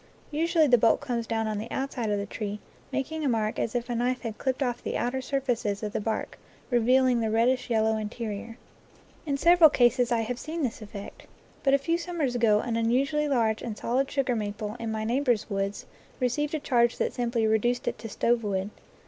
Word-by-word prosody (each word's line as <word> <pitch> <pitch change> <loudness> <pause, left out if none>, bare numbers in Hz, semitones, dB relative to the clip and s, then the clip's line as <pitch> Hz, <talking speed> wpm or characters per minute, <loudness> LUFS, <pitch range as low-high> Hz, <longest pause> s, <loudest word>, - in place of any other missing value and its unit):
Usually 325 +1 +3
the 250 -4 +5
bolt 225 0 +4
comes 240 -5 -3
down 225 -1 -1
on 215 -1 -2
the 225 +3 -6
outside 265 -4 -2
of 205 - +1
the 200 - -2
tree, 205 0 -5 0.3
making 290 +4 -2
a 280 - +2
mark 220 -2 0
as 230 - -2
if 240 -1 -1
a 245 - -2
knife 245 +2 0
had 225 -3 -6
clipped 260 +1 0
off 245 -2 -2
the - - -2
outer 260 +2 -1
surfaces 245 -6 -1
of 210 -1 -3
the - - -1
bark, 220 +1 -3 0.3
revealing 250 +1 +4
the 225 -1 0
reddish 240 +4 +2
yellow 220 -1 +2
interior. 220 +1 -5 0.7
In 280 -1 0
sev 345 +4 +5
eral 315 -3 +9
cases 245 0 +3
I 235 -1 +2
have 240 +2 -3
seen 320 +2 -4
this 235 -3 -2
effect. 205 -1 -9 0.3
But 275 0 +4
a - - +4
few 330 +5 -1
summers 335 -7 -2
ago 220 -3 +3
an 230 -2 -2
unusually 275 +6 +1
large 230 -6 +1
and 220 -3 -5
solid 260 +3 0
sugar 265 -3 0
maple 210 0 -3
in 230 -1 -3
my 220 0 -2
neighbor's 240 -2 0
woods 195 0 -2 0.3
received 290 +4 0
a - - -1
charge 240 -5 +2
that - - -1
simply 235 -2 0
reduced 220 +3 +1
it - - -2
to 225 - -7
stovewood. 210 -3 0
240 Hz, 210 wpm, -27 LUFS, 220-265 Hz, 0.7 s, eral